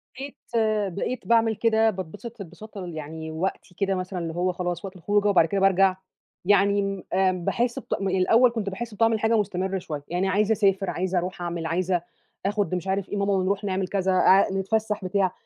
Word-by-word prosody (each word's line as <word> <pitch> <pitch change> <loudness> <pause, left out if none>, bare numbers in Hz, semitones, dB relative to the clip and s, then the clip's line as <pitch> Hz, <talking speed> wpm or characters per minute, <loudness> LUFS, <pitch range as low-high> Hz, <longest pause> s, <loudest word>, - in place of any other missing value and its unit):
بقيت 275 +2 -7 0.6
بقيت 245 +6 -4
باعمل 225 -1 +3
كده، 225 0 +3
باتبسط 200 +4 -7
انبساط 210 +4 -11
ال 180 -3 -6
يعني 160 +1 -6
وقتي 180 +2 -4
كده 195 0 0
مثلًا 185 0 -4
اللي 165 -1 -4
هو 180 +1 +1
خلاص 175 +1 -4
وقت 190 0 -8
الخروجة، 205 +4 +1
وبعد 185 -5 +5
كده 195 +4 -1
بارجع، 195 -1 +4 0.5
يعني 200 +1 +4
امم 195 -1 -3
آآ 190 0 +3
باحِس 235 +7 -1
بطع - - -3
الأوّل 195 +6 +3
كُنت 220 -4 -3
باحِس 225 +4 -6
بطعم 225 +1 +2
حاجة 225 +1 +2
مستمر 190 -2 -1
شويّة. 150 -5 -6
يعني 180 +3 -1
عايزة 205 +3 +2
أسافر، 195 -3 +2
عايزة 185 +1 -1
أروح 180 +1 -3
أعمل، 170 -1 -3
عايزة 175 +2 0 0.4
آخد 200 -2 0
مش 180 +1 -4
عارف 195 0 -1
إيه 205 - -3
ماما 200 0 +1
ونروح 195 +2 0
نعمل 190 -1 -1
كذا، 190 -1 0
اع 190 +1 +5
نتفسح، 210 +1 -1
بتاع. 185 0 +1
195 Hz, 190 wpm, -25 LUFS, 185-205 Hz, 0.6 s, وبعد